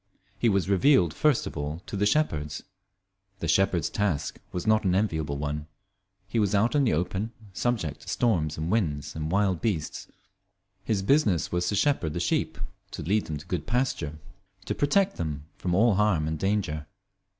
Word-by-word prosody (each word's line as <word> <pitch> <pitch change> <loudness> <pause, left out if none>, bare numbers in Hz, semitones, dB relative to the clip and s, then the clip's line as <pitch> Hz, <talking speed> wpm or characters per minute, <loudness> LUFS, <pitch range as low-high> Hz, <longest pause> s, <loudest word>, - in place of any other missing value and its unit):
He 120 - +3
was 100 -3 +1
revealed 100 - +4
first 150 - +2
of - - -6
all 75 +3 -4
to - - -6
the 105 +1 +2
shepherds. 80 - 0 0.7
The 85 - -4
shepherd's 85 0 +2
task 100 -9 -1
was 90 - -4
not 110 0 +3
an 90 -2 +2
enviable 80 -8 0
one. 75 +1 -3 0.6
He 115 +3 -1
was 105 -1 +2
out 110 +4 +3
in 145 -2 +3
the 115 - +2
open, 95 +7 -1 0.2
subject 110 -8 -1
to - - -10
storms 85 -11 +1
and 80 +3 -2
winds 80 -10 -1
and 80 0 -3
wild 95 -3 +2
beasts. 95 -9 -2 0.8
His 100 -2 0
business 100 - +2
was 90 0 0
to 105 - 0
shepherd 100 - +1
the 85 - -2
sheep, 85 - 0 0.3
to - - -6
lead 100 +7 +1
them 75 - -3
to 75 - -11
good 80 -4 -3
pasture, 115 - -1 0.5
to - - -1
protect 195 +7 +2
them 75 -4 -3 0.2
from 90 -1 0
all 110 +3 +5
harm 95 -6 +2
and 80 -1 -2
danger. 95 -7 -1
95 Hz, 180 wpm, -27 LUFS, 80-110 Hz, 0.8 s, all